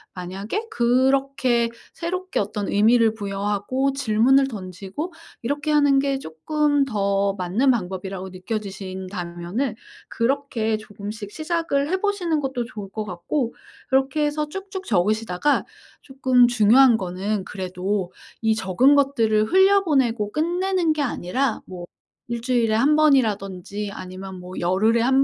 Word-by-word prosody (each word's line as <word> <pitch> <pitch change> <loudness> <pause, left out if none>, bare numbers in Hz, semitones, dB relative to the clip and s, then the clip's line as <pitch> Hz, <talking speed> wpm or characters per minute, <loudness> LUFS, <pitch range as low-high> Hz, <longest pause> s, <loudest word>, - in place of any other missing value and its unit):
만약에 195 - -4
그렇게 255 - +2 0.2
새롭게 365 +3 -3
어떤 205 0 -2
의미를 225 +2 +4
부여하고 205 +6 -1
질문을 265 +1 +3
던지고 195 - -6 0.3
이렇게 290 +5 -2
하는 285 -2 +4
게 275 -1 +1
쪼끔 290 - 0
더 200 -4 0
맞는 200 +8 +1
방법이라고 190 -2 -4
느껴지신다면은 190 +2 -4 0.4
그렇게 230 -3 0
조금씩 205 0 -8
시작을 310 -2 -1
해 375 - +1
보시는 360 -7 0
것도 265 -3 -2
좋을 210 -5 -8
것 215 0 -4
같고 210 - -3 0.3
그렇게 270 +3 +2
해서 300 0 -1
쭉쭉 385 +1 -7
적으시다가 215 +5 +1 0.4
쪼끔 260 -2 +3
중요한 240 +1 +5
거는 190 +2 -3
그래도 185 0 -3 0.3
이 220 0 +3
적은 220 +6 +3
것들을 230 -7 +3
흘려보내고 300 - +3
끝내는 350 +1 +1
게 305 - -2
아니라 255 0 -1
뭐 180 -2 -8 0.4
1 235 - -2
주일에 235 -3 +1
1 280 +7 +4
번이라든지 210 - +1
아니면 185 -1 -8
뭐 180 +1 -9
열흘에 205 +6 +2
1 265 +3 +4
230 Hz, 295 characters per minute, -23 LUFS, 195-275 Hz, 0.4 s, 중요한